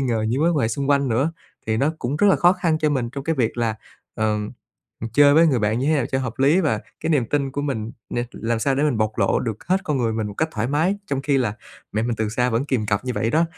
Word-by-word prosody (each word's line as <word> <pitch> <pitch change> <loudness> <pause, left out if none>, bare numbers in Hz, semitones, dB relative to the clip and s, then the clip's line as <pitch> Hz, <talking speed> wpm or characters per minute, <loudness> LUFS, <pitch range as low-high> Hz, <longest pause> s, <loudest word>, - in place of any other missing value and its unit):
ngờ 115 -5 0
những 130 +5 0
mối 170 - +4
quan 155 - 0
hệ 110 - +2
xung 140 +5 -2
quanh 140 -2 +3
nữa. 135 +8 +1 0.3
Thì 110 0 0
nó 140 +7 +1
cũng 130 +4 -2
rất 205 - +3
là - - +5
khó 175 +1 +5
khăn 170 -4 0
cho 155 -1 +1
mình 125 -4 -1
trong 140 0 -6
cái 165 - 0
việc 120 -2 0
là, 115 -2 0 0.4
ờ, 110 -1 0 0.7
ừ, 115 - -4
chơi 145 0 +6
với 165 +1 +6
người 130 -6 +2
bạn 110 +2 0
như 135 - -1
thế 155 - +3
nào 145 - +1
cho 130 - -1
hợp 125 -4 -4
lý 145 +7 +4
và 155 - 0 0.2
cái - - -2
niềm 140 -7 +2
tin 140 -2 0
của 145 - -3
mình 115 -6 -3 0.2
nè, 120 0 -1
làm 115 0 -2
sao 135 +3 +1
để 140 - 0
mình 140 -7 +1
bộc 110 0 -1
lộ - - +2
được 110 -4 -4
hết 190 +1 +2
con 150 -5 -1
người 115 -2 0
mình 110 -1 -2
một 105 - -7
cách 160 +5 0
thoải 110 +2 -1
mái, 160 +8 +1
trong 135 -1 -2
khi 140 -1 +2
là 110 -5 0 0.4
mẹ 110 - 0
mình 115 -1 -1
từ 110 -1 -1
xa 125 +3 0
vẫn 115 +3 0
kìm 125 -7 -1
cặp 105 +2 -1
như 125 - -2
vậy 115 0 0
đó. 165 +2 +3
130 Hz, 300 wpm, -22 LUFS, 115-145 Hz, 0.7 s, chơi